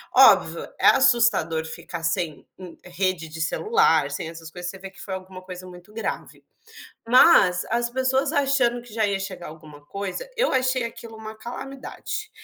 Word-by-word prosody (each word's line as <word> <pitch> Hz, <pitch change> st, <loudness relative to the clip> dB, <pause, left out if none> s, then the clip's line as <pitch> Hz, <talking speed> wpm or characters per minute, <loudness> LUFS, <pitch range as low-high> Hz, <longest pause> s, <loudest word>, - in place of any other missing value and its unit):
Óbvio, -, -, +6 dB, 0.2 s
é -, -, +4 dB
assustador 235 Hz, -, +4 dB
ficar 165 Hz, +1 st, -7 dB
sem, 165 Hz, -1 st, -2 dB
hum, 185 Hz, -2 st, -11 dB
rede 180 Hz, -2 st, -2 dB
de 160 Hz, +1 st, -7 dB
celular, 160 Hz, -, +2 dB
sem 160 Hz, -, -4 dB
essas 165 Hz, -1 st, -10 dB
coisas, 175 Hz, +1 st, -6 dB
você 195 Hz, -, -12 dB
vê 195 Hz, 0 st, -8 dB
que 195 Hz, -, -15 dB
foi 195 Hz, -, -6 dB
alguma 185 Hz, 0 st, -9 dB
coisa 185 Hz, 0 st, -9 dB
muito 180 Hz, +3 st, -14 dB
grave, 225 Hz, -, -5 dB, 0.6 s
mas 205 Hz, -, +6 dB
as 240 Hz, 0 st, +1 dB
pessoas 260 Hz, +1 st, +1 dB
achando 265 Hz, -4 st, +2 dB
que 240 Hz, -2 st, -15 dB
já 220 Hz, -1 st, +1 dB
ia 200 Hz, -1 st, 0 dB
chegar 185 Hz, -2 st, -6 dB
alguma 155 Hz, -2 st, -13 dB
coisa, 200 Hz, -, -5 dB
eu -, -, +1 dB
achei 255 Hz, -1 st, +1 dB
aquilo 230 Hz, -1 st, -8 dB
uma 220 Hz, 0 st, -8 dB
calamidade. 275 Hz, -, -7 dB
195 Hz, 170 wpm, -24 LUFS, 175-250 Hz, 0.6 s, Óbvio